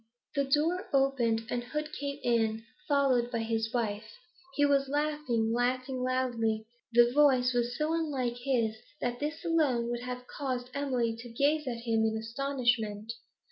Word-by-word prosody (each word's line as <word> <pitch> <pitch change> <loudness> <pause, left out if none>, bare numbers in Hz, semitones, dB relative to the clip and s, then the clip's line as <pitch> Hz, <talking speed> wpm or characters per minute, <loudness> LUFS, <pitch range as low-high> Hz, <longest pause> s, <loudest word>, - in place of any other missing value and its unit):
The 280 -1 +1
door 320 +7 +1
opened, 240 -5 +2
and 240 0 -1
Hood 300 +4 -4
came 280 0 -4
in, 225 -2 +1 0.2
followed 270 -4 +3
by 240 - -2
his 225 0 -1
wife. 215 - -2 0.4
He 290 - +4
was 275 -1 +2
laughing, 290 -6 0
laughing 255 +2 0
loudly; 240 -4 0 0.3
the 240 0 +6
voice 260 -3 +4
was 240 0 0
so 310 +1 0
unlike 275 -7 -1
his 240 -4 0 0.2
that 245 0 -2
this 310 +4 -4
alone 285 -8 +2
would 240 0 -3
have 250 0 -5
caused 255 -2 -4
Emily 255 -5 0
to 240 +1 -9
gaze 285 +5 +1
at 235 -2 -3
him 225 -2 +2
in 220 0 +1
astonishment. 230 -3 -1
250 Hz, 155 wpm, -30 LUFS, 230-280 Hz, 0.4 s, the